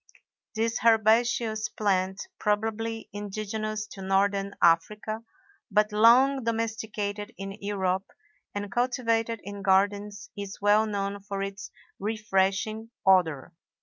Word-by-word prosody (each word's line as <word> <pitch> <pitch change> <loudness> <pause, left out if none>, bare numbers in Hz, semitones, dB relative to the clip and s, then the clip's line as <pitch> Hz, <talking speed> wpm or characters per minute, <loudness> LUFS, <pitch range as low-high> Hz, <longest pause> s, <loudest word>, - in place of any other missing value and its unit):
This 225 +1 0
herbaceous 225 0 +3
plant, 190 -2 -1
probably 225 +2 -1
indigenous 215 +1 -4
to 195 - -10
northern 195 +1 +1
Africa, 210 +6 +2 0.5
but 210 0 +2
long 250 +5 +5
domesticated 220 -2 -3
in 195 0 -5
Europe 190 -2 -1 0.5
and 205 -1 -4
cultivated 230 -2 0
in 200 0 -7
gardens, 200 +1 +1
is 200 -1 -7
well 210 +2 +4
known 200 -1 -2
for 200 0 -4
its 195 0 -6 0.3
refreshing 210 +1 0 0.2
odor. 170 -6 +3
210 Hz, 105 wpm, -27 LUFS, 195-220 Hz, 0.5 s, long